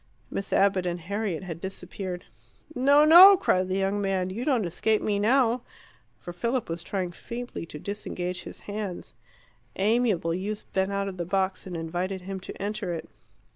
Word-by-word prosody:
Miss 195 - -4
Abbott 195 -2 +3
and 175 0 -2
Harriet 195 0 -3
had 170 -3 -7
disappeared. 190 -1 -6 0.5
"No! 285 +2 +5
no!" 370 +5 +10
cried 185 - +1
the 185 - 0
young 195 +1 0
man. 190 -2 0
"You 225 +6 -4
don't 250 -7 +1
escape 215 +5 +1
me 205 -1 0
now." 240 +2 +3 0.6
For 175 - -9
Philip 235 +6 -2
was 165 +1 -3
trying 180 0 -3
feebly 235 -1 -7
to 150 - -8
disengage 180 -1 -4
his - - -9
hands. 205 -3 -6 0.6
Amiable 205 -5 +1
youths 205 +4 -3
bent 190 +1 -1
out 200 0 -1
of 190 -1 -6
the 175 - -2
box 190 +1 -1
and 180 -2 -5
invited 180 +4 -3
him 190 +1 -5
to 185 - -9
enter 205 -2 -3
it. 160 - -8
195 Hz, 175 wpm, -27 LUFS, 180-215 Hz, 0.6 s, no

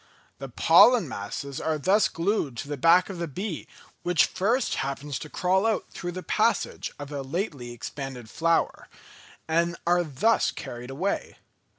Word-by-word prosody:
The 135 0 -6
pollen 200 - +6
masses 130 +5 -5
are 160 -1 0
thus 190 +8 +3
glued 165 - -1
to - - -5
the 145 - -3
back 165 +6 +5
of 180 - -7
the 170 - -2
bee 180 +3 -5 0.3
which 175 -3 +3
first 230 +7 0
happens 140 +1 -4
to 155 - -8
crawl 190 +6 +1
out 220 - 0
through 175 -1 -5
the 185 +1 -6
passage - - 0
of 145 0 -8
a 145 -1 -3
lately 140 - -4
expanded 125 0 -7
flower, 165 +7 0 0.6
and 170 +1 +1
are 175 +1 +3
thus 165 - +2
carried 120 +1 -7
away. 175 +9 -3
165 Hz, 160 wpm, -26 LUFS, 140-185 Hz, 0.6 s, pollen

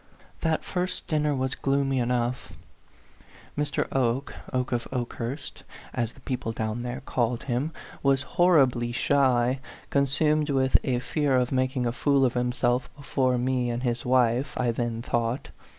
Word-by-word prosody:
That 160 -1 0
first 180 0 -2
dinner 150 -2 +1
was 130 0 -1
gloomy 135 -1 +1
enough. 120 0 -1 1.0
Mr. 150 0 0
Oke 130 +1 +1 0.2
Oke 125 -1 -1
of 120 -2 -1
Okehurst, 125 +2 -4 0.3
as 120 -1 -1
the 130 - -18
people 125 -3 -3
down 110 +1 -3
there 125 +2 -4
called 120 -2 -1
him 135 +4 -1 0.3
was 135 0 +3 0.2
horribly 130 -9 +4
shy, 130 0 +2 0.3
con 140 -1 +3
sumed 150 +2 +2
with 130 -1 +1
a 125 -2 +1
fear 140 +2 0
of 125 -1 +1
makicg 130 -1 0
a 120 - +1
fool 135 +2 +3
of 125 - +1
himself 125 0 0
before 130 -3 0
me 125 0 0
and 120 +1 -2
his 120 -2 -1
wife, 125 +1 +2
I 125 -2 +2
then 115 -1 -2
thought. 120 +2 -1
130 Hz, 150 wpm, -27 LUFS, 120-140 Hz, 1.0 s, horribly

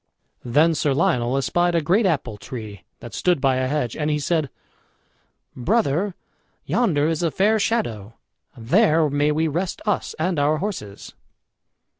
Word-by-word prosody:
Then 150 +7 +3
Sir 145 -3 0
Lionel 125 -4 +1
espied 175 +5 +1
a - - +4
great 195 +7 +3
apple 130 - -2
tree 105 -4 -9 0.2
that 120 - -10
stood 180 -4 +1
by 135 -1 +2
a 130 0 0
hedge, 135 -3 -2
and 150 0 -1
he 150 - +1
said: 150 0 -1 1.1
"Brother, 185 - 0 0.5
yonder 160 -12 +1
is 165 0 -1
a 170 - +1
fair 210 +7 +2
shadow 115 - -2 0.4
there 155 - +3
may 145 +1 +2
we 160 +2 +1
rest 175 +5 -2
us 210 - -1
and 165 0 -1
our 150 +2 +2
horses." 150 - -6
150 Hz, 150 wpm, -22 LUFS, 130-175 Hz, 1.1 s, a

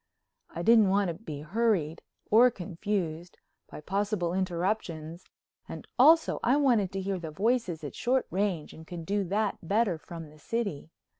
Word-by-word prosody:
I 170 - -6
didn't 220 -2 +6
want 195 -1 +2
to - - -2
be 160 -6 -8
hurried, 175 -3 0 0.3
or 235 +4 +7
confused, 175 -4 -4 0.3
by - - -9
possible 195 0 -1
interruptions, 175 -3 -2 0.4
and - - -7
also 320 +5 +5
I 255 +4 +3
wanted 235 -10 +2
to 195 - -2
hear 190 -1 -2
the 165 -2 -6
voices 190 -1 -1
at 145 - -6
short 255 +2 0
range 190 -5 -1
and 160 0 -13
could 170 -2 -7
do 200 +3 0
that 205 +3 -1
better 195 -1 +1
from 165 -2 -9
the 155 - -18
city. 200 -6 -3
190 Hz, 160 wpm, -29 LUFS, 165-215 Hz, 0.4 s, or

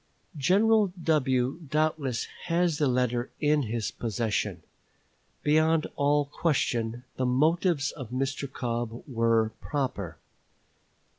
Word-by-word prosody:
General 205 +6 +4
W. 130 -3 +1
doubtless 150 -5 0 0.2
has 170 -2 +1
the 150 - +3
letter 125 -1 0
in 150 0 +3
his 115 -3 -2
possession. 105 -6 -2 0.8
Beyond 155 +1 +3
all 145 0 +2
question, 120 -6 -1
the 130 - 0
motives 155 +3 +2
of 130 -6 -8
Mr. 135 +2 -2
Cobb 120 -2 -3
were 115 -3 +2
proper. 130 - -3
135 Hz, 100 wpm, -28 LUFS, 120-155 Hz, 0.8 s, General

